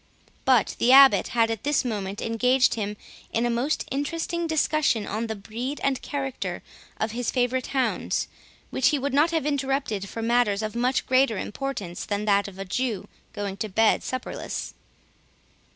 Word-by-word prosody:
But 255 Hz, -5 st, +3 dB
the 245 Hz, -, +4 dB
Abbot 275 Hz, 0 st, +8 dB
had, 230 Hz, -1 st, +2 dB
at 225 Hz, -, -3 dB
this 290 Hz, -1 st, +1 dB
moment, 205 Hz, -3 st, -3 dB
engaged 250 Hz, +3 st, +3 dB
him 210 Hz, -2 st, -3 dB, 0.3 s
in 230 Hz, +1 st, +1 dB
a 240 Hz, -, +1 dB
most 250 Hz, +6 st, 0 dB
interesting 330 Hz, +5 st, -2 dB
discussion 305 Hz, -8 st, +1 dB
on 220 Hz, +3 st, -3 dB
the 220 Hz, -, -3 dB
breed 235 Hz, +8 st, -5 dB
and 270 Hz, -2 st, +1 dB
character 270 Hz, -3 st, -4 dB, 0.4 s
of 220 Hz, -, -1 dB
his 240 Hz, +1 st, -2 dB
favourite 250 Hz, 0 st, 0 dB
hounds, 265 Hz, -2 st, 0 dB, 0.4 s
which 260 Hz, -, +2 dB
he 300 Hz, -, +3 dB
would 280 Hz, +1 st, -2 dB
not 295 Hz, +4 st, +4 dB
have 325 Hz, -4 st, -1 dB
interrupted 270 Hz, -8 st, -1 dB
for 225 Hz, -, -5 dB
matters 225 Hz, -3 st, +2 dB
of 215 Hz, +1 st, -4 dB
much 250 Hz, +2 st, +1 dB
greater 255 Hz, -4 st, +3 dB
importance 210 Hz, -8 st, -4 dB
than 205 Hz, 0 st, -2 dB
that 200 Hz, -1 st, +3 dB
of 195 Hz, -2 st, -11 dB
a 195 Hz, -, -5 dB
Jew 210 Hz, -1 st, -2 dB, 0.2 s
going 200 Hz, -1 st, -4 dB
to 215 Hz, +2 st, -3 dB
bed 220 Hz, +3 st, +3 dB
supperless. 255 Hz, -, -5 dB
240 Hz, 170 wpm, -25 LUFS, 215-270 Hz, 0.4 s, Abbot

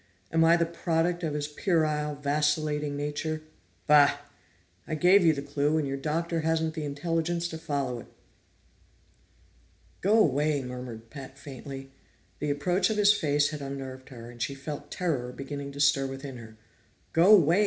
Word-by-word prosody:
"Am 165 Hz, 0 st, +4 dB
I 165 Hz, +1 st, +6 dB
the 170 Hz, -, +2 dB
product 170 Hz, +1 st, 0 dB
of 155 Hz, -3 st, -2 dB
his 145 Hz, -1 st, -2 dB
puerile, 150 Hz, -2 st, 0 dB
vacillating 150 Hz, 0 st, 0 dB
nature? 150 Hz, +2 st, -3 dB, 0.4 s
Bah! 145 Hz, -1 st, +6 dB, 0.7 s
I 155 Hz, -, -2 dB
gave 180 Hz, +5 st, +5 dB
you 165 Hz, -, +6 dB
the 140 Hz, -2 st, -3 dB
clue, 145 Hz, +2 st, 0 dB
and 150 Hz, -3 st, 0 dB
your 135 Hz, -, -2 dB
Doctor 165 Hz, +4 st, -1 dB
hasn't 160 Hz, 0 st, 0 dB
the 155 Hz, -2 st, -4 dB
intelligence 165 Hz, +4 st, -1 dB
to 160 Hz, -, -6 dB
follow 140 Hz, -6 st, -2 dB
it!" -, -, -11 dB, 1.9 s
"Go 205 Hz, +4 st, +4 dB
away!" 150 Hz, -, +2 dB
murmured 125 Hz, -3 st, -8 dB
Pat 135 Hz, -2 st, -9 dB
faintly. 135 Hz, -1 st, -9 dB, 0.5 s
The 150 Hz, -, -2 dB
approach 175 Hz, +9 st, +1 dB
of 220 Hz, -, -1 dB
his 205 Hz, 0 st, +6 dB
face 145 Hz, -6 st, +2 dB
had 150 Hz, -1 st, -6 dB
unnerved 135 Hz, -1 st, -7 dB
her, 120 Hz, -3 st, -10 dB
and 120 Hz, -1 st, -12 dB
she 140 Hz, +3 st, -2 dB
felt 145 Hz, +1 st, -7 dB
terror 140 Hz, -9 st, -2 dB
beginning 140 Hz, +2 st, -6 dB
to 140 Hz, -, -9 dB
stir 140 Hz, -1 st, +3 dB
within 135 Hz, -1 st, -7 dB
her. 110 Hz, -2 st, -12 dB, 0.6 s
"Go 180 Hz, +6 st, +7 dB
away!" 170 Hz, 0 st, +4 dB
150 Hz, 165 wpm, -28 LUFS, 140-165 Hz, 1.9 s, Go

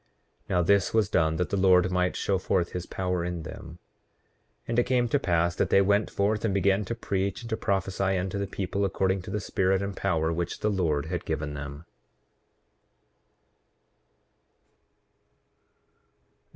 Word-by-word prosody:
Now, 90 Hz, -1 st, +2 dB
this 100 Hz, +3 st, +2 dB
was 110 Hz, -3 st, +3 dB
done 80 Hz, -1 st, +2 dB
that 90 Hz, +2 st, -2 dB
the 100 Hz, -, +1 dB
Lord 90 Hz, -1 st, +5 dB
might 90 Hz, 0 st, +1 dB
show 95 Hz, -2 st, 0 dB
forth 90 Hz, -1 st, 0 dB
his 90 Hz, -1 st, -5 dB
power 90 Hz, -2 st, -2 dB
in 85 Hz, -2 st, -4 dB
them. 80 Hz, +2 st, -9 dB, 0.9 s
8:32 -, -, -15 dB
And 115 Hz, +1 st, +2 dB
it -, -, +4 dB
came 125 Hz, -1 st, +2 dB
to 145 Hz, -, +2 dB
pass 85 Hz, -6 st, +1 dB
that -, -, 0 dB
they -, -, +5 dB
went 100 Hz, +2 st, +2 dB
forth 105 Hz, +2 st, 0 dB
and 105 Hz, -4 st, 0 dB
began 100 Hz, +1 st, +2 dB
to 115 Hz, -, -3 dB
preach 100 Hz, -3 st, -2 dB
and 115 Hz, -, -8 dB
to -, -, +2 dB
prophesy 95 Hz, -2 st, 0 dB
unto 95 Hz, +2 st, -2 dB
the 100 Hz, -, -2 dB
people, 100 Hz, +1 st, -2 dB
according 95 Hz, 0 st, 0 dB
to 90 Hz, -, -9 dB
the 105 Hz, +2 st, -2 dB
spirit 95 Hz, -1 st, 0 dB
and 100 Hz, 0 st, -4 dB
power 80 Hz, -4 st, 0 dB
which 85 Hz, +1 st, -3 dB
the 105 Hz, -, +1 dB
Lord 80 Hz, -7 st, 0 dB
had 85 Hz, +1 st, -3 dB
given 80 Hz, -2 st, -3 dB
them. 75 Hz, +2 st, -7 dB
95 Hz, 165 wpm, -27 LUFS, 85-100 Hz, 0.9 s, Lord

